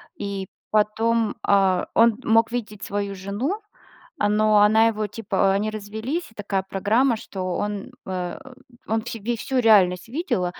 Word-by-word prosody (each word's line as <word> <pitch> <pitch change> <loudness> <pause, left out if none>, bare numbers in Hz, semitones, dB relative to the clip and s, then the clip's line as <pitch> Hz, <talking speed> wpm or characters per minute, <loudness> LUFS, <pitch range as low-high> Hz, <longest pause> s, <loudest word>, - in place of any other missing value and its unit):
и 195 -2 -4 0.2
потом, 220 +1 +1
а, 190 -2 +3
он 230 -1 +4
мог 225 0 +3
видеть 215 -4 -5
свою 200 0 -3
жену, 210 - -3 0.6
но 210 0 +3
она 220 +2 +5
его 215 -1 -1
типа 200 -2 0
они 205 +2 0
развелись, 220 - -5
и 220 - -23
такая 195 -2 -2
программа, 220 +6 +1
что 185 -4 -5
он, 205 -1 -3
э, 180 -2 -4 0.5
он 220 +1 0
все 230 +1 -6
ве 235 +3 -2
всю 260 +4 -3
реальность 195 -5 +4
видел, 265 - -1
210 Hz, 145 wpm, -23 LUFS, 195-225 Hz, 0.6 s, она